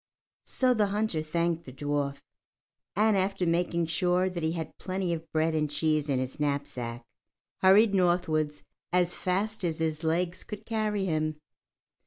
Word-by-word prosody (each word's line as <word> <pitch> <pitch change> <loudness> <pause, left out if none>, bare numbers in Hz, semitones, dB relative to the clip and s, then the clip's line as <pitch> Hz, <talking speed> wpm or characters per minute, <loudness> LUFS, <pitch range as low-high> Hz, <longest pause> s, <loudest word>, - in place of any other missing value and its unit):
So 255 -1 +3
the 215 -3 +2
hunter 205 -5 0
thanked 170 +1 -1
the 130 - -8
dwarf, 140 +1 -2 0.7
and 215 +2 +4
after 195 -1 +1
making 170 0 +1
sure 180 +3 +1
that 175 -1 -4
he 160 0 0
had 165 -2 -5
plenty 185 -2 -1
of 165 -1 -6
bread 160 +1 +1
and 155 -1 +1
cheese 150 0 0
in 135 - +2
his 130 +3 -3
knapsack, 130 -5 -2 0.6
hurried 200 +3 +6
northwards 170 -5 +1 0.3
as 180 0 +2
fast 200 +4 -1
as 165 -3 0
his 160 0 -2
legs 170 +3 0
could 210 0 -8
carry 215 -3 0
him. 155 -3 -1
170 Hz, 155 wpm, -29 LUFS, 155-190 Hz, 0.7 s, hurried